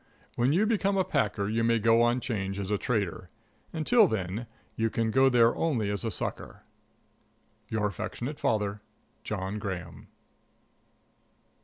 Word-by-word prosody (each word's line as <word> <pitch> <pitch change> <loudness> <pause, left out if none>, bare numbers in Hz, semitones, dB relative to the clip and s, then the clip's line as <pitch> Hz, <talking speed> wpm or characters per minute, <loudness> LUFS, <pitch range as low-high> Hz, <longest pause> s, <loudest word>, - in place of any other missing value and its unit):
When 120 +3 +2
you 185 +8 +3
become 200 -3 +1
a 190 - +3
packer 105 - 0
you 115 +2 0
may 115 0 +3
go 115 +1 +4
on 120 +1 +2
'Change 100 -5 -3
as 100 0 -4
a 105 - +2
trader; 100 -6 -2 0.4
until 205 +7 +4
then 105 - -3 0.3
you 115 0 +1
can 110 0 -1
go 135 +3 +5
there 120 -2 +4
only 120 -11 0
as 100 - -3
a 115 - -1
sucker. 105 - -5 1.1
Your 110 -2 0
affectionate 110 +8 -4
father, 105 -1 0 0.4
JOHN 100 0 -3
GRAHAM. 90 -5 -6
115 Hz, 145 wpm, -28 LUFS, 100-125 Hz, 1.1 s, go